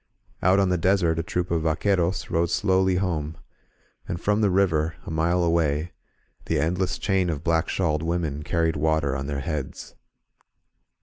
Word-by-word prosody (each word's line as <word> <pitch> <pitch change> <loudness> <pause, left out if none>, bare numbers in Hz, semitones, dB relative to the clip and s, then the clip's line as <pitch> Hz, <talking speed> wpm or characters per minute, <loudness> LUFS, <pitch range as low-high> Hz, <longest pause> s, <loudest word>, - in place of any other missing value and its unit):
Out 95 +2 +4
on 100 -1 +3
the 90 -1 +1
desert 85 -2 +2
a - - +2
troop 90 +2 -3
of 85 -1 +1
vctqtieros 90 +3 0
rode 85 0 +1
slowly 95 -1 +2
home; 80 -5 -2 0.7
and 85 - -3
from 105 +4 +1
the 105 - +3
river, 85 -5 +1
a - - -6
mile 85 +3 +1
away, 80 -1 +1 0.5
the - - 0
endless 90 +3 0
chain 95 -3 +1
of 75 -2 -3
black 80 -1 +1
shawled 75 -5 0
women 80 -3 -2
carried 80 +1 0
water 75 -2 +1
on 70 0 -4
their 70 -1 -3
heads. 75 -3 -5
85 Hz, 165 wpm, -25 LUFS, 80-90 Hz, 0.7 s, Out